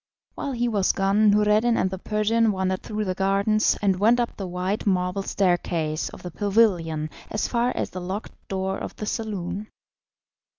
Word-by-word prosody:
While 280 - -4
he 240 0 0
was 205 -5 +2
gone 200 +2 +3
Noureddin 210 +3 +3
and 185 - +1
the 190 - -5
Persian 215 +2 +2
wandered 190 -1 -1
through 215 0 -3
the 185 - -1
gardens 195 +3 +2
and 190 -2 +2
went 230 +4 +4
up 240 - -1
the 195 - -5
white 185 +4 -2
marble 180 0 +1
staircase 175 -5 0
of - - -12
the 180 - -6
pavilion 175 -7 +1 0.2
as 210 - -1
far 240 +1 +1
as - - -2
the 185 - -6
locked 190 +4 -5
door 190 0 -2
of - - -6
the 210 - -5
saloon. 205 -2 -4
200 Hz, 175 wpm, -24 LUFS, 185-215 Hz, 0.2 s, went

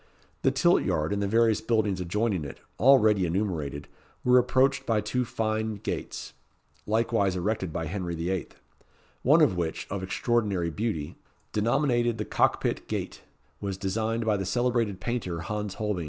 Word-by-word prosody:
The - - +4
tilt - - +3
yard, 75 +5 0
and 100 - -1
the 100 - 0
various 115 0 +3
buildings 110 -5 +1
adjoining 95 0 0
it, 70 - -8 0.2
already 110 -6 +5
enumerated, 80 -6 -2 0.4
were 125 0 +6
approached 130 +2 +2
by 110 -2 +2
two 125 +4 -1
fine 110 -1 -1
gates, 100 - -5 0.5
likewise 110 -3 +1
erected 95 -1 -1
by 80 +1 -3
Henry 85 0 -3
VIII., 85 +1 -2 0.7
one 150 +6 +5
of 145 -11 +4
which, 85 -2 -2
of 100 -1 -2
extraordinary 95 -3 0
beauty, 100 -6 -3 0.3
denominated 120 +1 +1
the 105 - -3
Cock - - +2
pit - - -2
Gate, - - -4 0.4
was 100 -2 -4
designed 110 +4 -1
by 105 -2 +2
the 95 - -2
celebrated 120 -4 0
painter, 100 -9 -3
Hans 105 +2 -4
Holbein. 105 -3 -2
105 Hz, 155 wpm, -27 LUFS, 95-115 Hz, 0.7 s, were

